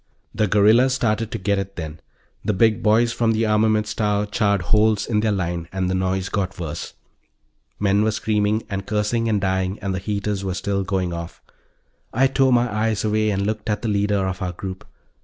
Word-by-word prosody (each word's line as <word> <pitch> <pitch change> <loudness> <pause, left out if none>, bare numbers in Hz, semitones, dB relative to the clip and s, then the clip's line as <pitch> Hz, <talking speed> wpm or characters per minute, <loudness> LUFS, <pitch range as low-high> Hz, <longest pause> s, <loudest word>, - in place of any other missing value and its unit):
The 110 +1 +1
guerrillas 110 +6 +4
started 115 -3 0
to - - -4
get 100 +1 0
it, 100 0 -5
then. 80 -1 -6 0.4
The 105 - 0
big 110 +3 +3
boys 115 +2 +3
from 115 -1 +1
the 110 +1 +1
armaments 110 0 +2
tower 105 -1 0
charred 100 -2 +1
holes 105 +2 +2
in 105 -2 0
their 110 0 +1
line, 85 -4 -2
and 95 -1 -1
the - - 0
noise 95 0 -1
got 95 -2 -3
worse; 80 -4 -5 0.8
men 100 0 +2
were 110 - +2
screaming 110 0 0
and 100 -2 -5
cursing 110 +2 0
and 105 -2 +2
dying 95 0 -1
and 100 -2 -3
the 95 - -2
heaters 100 0 -2
were 95 -2 -2
still 100 0 -1
going 95 -2 -1
off. 85 0 -7 0.7
I 130 +4 +3
tore 135 0 +3
my 120 0 +3
eyes 110 -1 0
away 110 0 +1
and 100 -1 0
looked 110 +1 -3
at 105 +1 -1
the 115 - 0
leader 100 -1 +1
of 95 0 -4
our 90 -1 -2
group. 95 +1 -7
105 Hz, 200 wpm, -22 LUFS, 95-110 Hz, 0.8 s, guerrillas